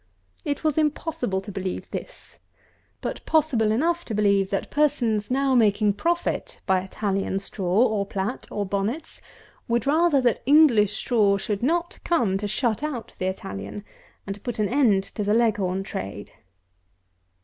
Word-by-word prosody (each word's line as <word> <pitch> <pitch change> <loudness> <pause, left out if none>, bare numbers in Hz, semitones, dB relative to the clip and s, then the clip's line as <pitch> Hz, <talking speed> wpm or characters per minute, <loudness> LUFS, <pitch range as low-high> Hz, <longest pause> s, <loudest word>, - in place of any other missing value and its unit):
It 285 +1 -3
was 310 -1 +2
impossible 295 - -1
to 205 - -8
believe 190 -1 -5
this; - - -8 0.6
but - - -4
possible 280 -9 +2
enough 335 +9 +1
to 220 - -4
believe, 200 -2 +2
that 195 -1 -3
persons 235 -8 +1
now 270 +1 +2
making 210 -3 +3
profit 345 - -2
by 190 -1 +3
Italian 195 0 -2
straw, 195 +2 +1
or 215 -4 0
plat, 200 +6 -3
or 205 - -2
bonnets, 200 +10 -3 0.5
would 235 +2 0
rather 310 +1 +3
that 245 -3 +1
English 265 -9 +5
straw 210 -5 +2
should 200 0 -3 0.4
come 220 - +1
to 205 - -3
shut 220 +2 0
out 290 -6 -4
the 185 - -1
Italian 100 - -6 0.4
and 195 - -3
to 200 - -14
put 245 -3 -4
an 210 -2 0
end 235 -8 +3
to 210 - -5
the 205 +2 +2
Leghorn 200 -5 +1
trade. 100 - -6
215 Hz, 150 wpm, -24 LUFS, 195-275 Hz, 0.6 s, English